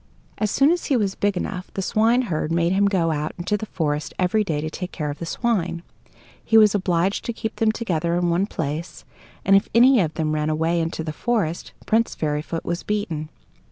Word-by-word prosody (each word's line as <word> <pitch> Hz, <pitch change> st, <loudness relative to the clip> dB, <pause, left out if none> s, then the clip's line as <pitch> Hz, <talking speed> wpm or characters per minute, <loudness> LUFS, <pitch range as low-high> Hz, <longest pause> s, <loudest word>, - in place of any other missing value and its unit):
As 215 Hz, -, +1 dB
soon 275 Hz, +8 st, +4 dB
as 350 Hz, -, -1 dB
he 270 Hz, -, +2 dB
was 200 Hz, -4 st, 0 dB
big 200 Hz, -2 st, 0 dB
enough, 185 Hz, 0 st, -4 dB
the 195 Hz, -, -1 dB
swineherd 215 Hz, -7 st, +1 dB
made 170 Hz, +1 st, +2 dB
him 200 Hz, +2 st, +3 dB
go 175 Hz, -5 st, +1 dB
out 150 Hz, 0 st, -2 dB
into 185 Hz, +4 st, -1 dB
the 215 Hz, +1 st, -4 dB
forest 150 Hz, -4 st, -2 dB
every 190 Hz, +4 st, +2 dB
day 160 Hz, -7 st, -2 dB
to 155 Hz, -, -3 dB
take 180 Hz, +1 st, -5 dB
care 150 Hz, -2 st, -3 dB
of 145 Hz, -, -9 dB
the 170 Hz, -, -5 dB
swine. 180 Hz, -6 st, -1 dB, 0.6 s
He 225 Hz, -, +4 dB
was 215 Hz, -2 st, +6 dB
obliged 185 Hz, -1 st, 0 dB
to 235 Hz, -, -2 dB
keep 220 Hz, 0 st, -5 dB
them 220 Hz, -1 st, +3 dB
together 170 Hz, -7 st, -1 dB
in 175 Hz, -1 st, +1 dB
one 180 Hz, +4 st, +1 dB
place, 160 Hz, -2 st, -5 dB, 0.4 s
and 195 Hz, -, +5 dB
if 195 Hz, -, +3 dB
any 250 Hz, +2 st, +7 dB
of 160 Hz, -5 st, 0 dB
them 155 Hz, -2 st, -1 dB
ran 150 Hz, 0 st, 0 dB
away 165 Hz, +2 st, +1 dB
into 165 Hz, 0 st, -3 dB
the 155 Hz, -1 st, -4 dB
forest, 195 Hz, -4 st, -2 dB
Prince 225 Hz, +1 st, +1 dB
Fairyfoot 155 Hz, +2 st, -3 dB
was 170 Hz, 0 st, -2 dB
beaten. 170 Hz, -8 st, -3 dB
180 Hz, 210 wpm, -23 LUFS, 160-215 Hz, 0.6 s, any